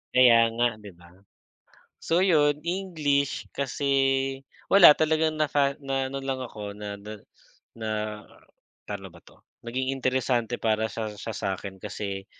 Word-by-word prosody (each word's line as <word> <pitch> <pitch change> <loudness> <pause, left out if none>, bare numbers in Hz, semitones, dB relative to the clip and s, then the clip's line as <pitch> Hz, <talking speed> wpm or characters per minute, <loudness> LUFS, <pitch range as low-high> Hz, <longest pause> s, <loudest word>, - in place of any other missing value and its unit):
Kaya 115 -2 +7
nga 120 +1 +3
di 105 -2 -11
ba? 85 0 -18 0.9
So 170 +2 +1
yun, 150 -6 +3
English 155 -7 -1
kasi, 140 +1 -3 0.8
wala 200 -6 +9
talagang 155 0 +1
naka 140 -2 +1
na-ano 135 -1 -2
lang 135 -1 -3
ako 105 -4 -7
na 105 -1 -6
na 105 +1 -8 0.6
na 110 -1 -4 0.9
paano - - -7
ba - - -16
to, - - -20 0.3
naging 130 +3 -2
interesante 125 -2 0
para 110 0 0
sa 110 -1 -4
siya 110 +2 -6
sa'kin 95 0 -4
kasi, 100 -1 -5
130 Hz, 130 wpm, -26 LUFS, 110-145 Hz, 0.9 s, wala